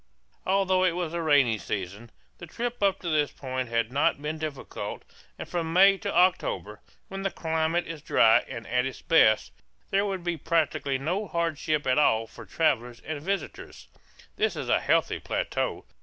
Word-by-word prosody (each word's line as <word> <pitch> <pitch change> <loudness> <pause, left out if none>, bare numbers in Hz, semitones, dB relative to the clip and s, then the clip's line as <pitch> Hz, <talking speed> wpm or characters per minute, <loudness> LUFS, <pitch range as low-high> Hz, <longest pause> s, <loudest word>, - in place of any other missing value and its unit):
Although 190 -1 +2
it 180 -2 +3
was 175 -3 -2
the 170 0 -3
rainy 140 -8 +3
season, 100 +4 -5 0.3
the 175 - -9
trip 240 +7 -4
up 195 -1 +2
to 175 - -3
this 150 -2 +1
point 130 -2 -4
had 115 0 0
not 140 0 +2
been 150 +2 -4
difficult, 150 -3 -6 0.3
and - - -7
from 165 -2 -3
May 195 +2 +6
to - - -3
October, 170 - +1 0.3
when 195 0 -6
the 195 - 0
climate 160 0 -1
is 165 -3 -7
dry 110 -5 +5
and 115 - -7
at 125 +2 0
its 135 - -9
best, 110 -10 +4 0.4
there 200 +1 +2
would 190 -3 -4
be 175 -1 -2
practically 145 -3 0
no 180 +10 -2
hardship 160 -4 -1
at 130 +2 +3
all 115 -6 +3
for 110 - -13
travellers 120 -7 0
and 150 -1 -5
visitors. 195 +5 -5 0.5
This 440 +1 +1
is - - -5
a - - +4
healthy - - +1
plateau. - - -2
160 Hz, 175 wpm, -27 LUFS, 130-180 Hz, 0.5 s, May